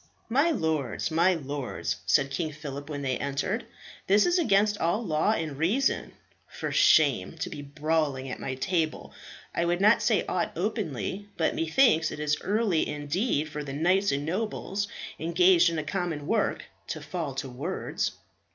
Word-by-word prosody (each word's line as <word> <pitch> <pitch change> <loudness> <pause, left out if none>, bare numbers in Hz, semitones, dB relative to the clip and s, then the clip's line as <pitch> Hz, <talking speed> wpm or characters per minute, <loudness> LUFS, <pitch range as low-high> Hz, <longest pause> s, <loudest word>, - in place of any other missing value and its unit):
"My 280 +8 +3
lords, 160 - -1
my 170 +3 +4
lords," 140 -4 -3
said 135 0 +3
King 155 +3 -2
Phillip 145 -1 -7
when 145 -2 -4
they 130 -2 -1
entered, 145 - -2 0.4
"this 205 +2 +5
is 355 +1 +3
against 205 - +3
all 190 +8 0
law 155 +5 +2
and 155 -8 -3
reason. 220 +12 +1 0.3
For - - -5
shame, 135 -12 +4
to - - -4
be 145 - -6
brawling 145 -2 -1
at 130 - -5
my 130 - -3
table. 160 +2 -1 0.4
I - - 0
would 175 +1 +1
not 215 +4 +5
say 220 - +2
aught 180 - -1
openly, 190 - -3
but 160 - +1
methinks 165 -1 +3
it - - -7
is 150 0 0
early 205 -5 +1
indeed 150 - -1
for 150 -1 -5
the 135 -2 -6
knights 185 +7 +2
and 140 +1 -1
nobles 200 +2 -2 0.3
engaged 170 +2 +4
in 165 - -3
a 155 - -1
common 160 -2 -3
work 220 +7 0 0.2
to - - -4
fall 160 -7 -4
to 135 0 -3
words." 145 +10 -3
160 Hz, 165 wpm, -27 LUFS, 145-195 Hz, 0.4 s, this